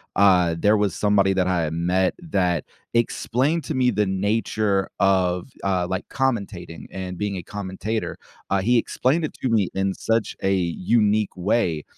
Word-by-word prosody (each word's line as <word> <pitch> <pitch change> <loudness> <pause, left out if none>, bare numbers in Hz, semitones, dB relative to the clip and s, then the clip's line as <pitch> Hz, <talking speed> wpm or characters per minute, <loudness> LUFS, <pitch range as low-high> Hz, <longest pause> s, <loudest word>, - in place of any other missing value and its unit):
uh, 90 -4 +4
there 105 +5 +3
was 100 -4 +1
somebody 100 -2 +3
that 95 -1 +1
I 90 -2 +1
had 80 +1 -2
met 90 +2 +1
that 90 - 0 0.3
explained 130 +6 +1
to 155 - -3
me 125 -2 +2
the 105 0 +1
nature 100 0 0
of, 95 +1 +2
uh, 95 -3 0
like, 95 +1 -4
commentating 100 -10 -3
and 90 -2 -6
being 100 -2 -2
a 85 - -6
commentator. 105 +3 -4 0.3
Uh, 100 0 +2
he 120 +4 +3
explained 135 +7 +1
it 155 - -3
to 130 - 0
me 105 -5 +2
in 95 0 0
such 115 -1 -1
a 95 0 +2
unique 100 +4 +1
way 90 -5 0
100 Hz, 165 wpm, -23 LUFS, 90-110 Hz, 0.3 s, uh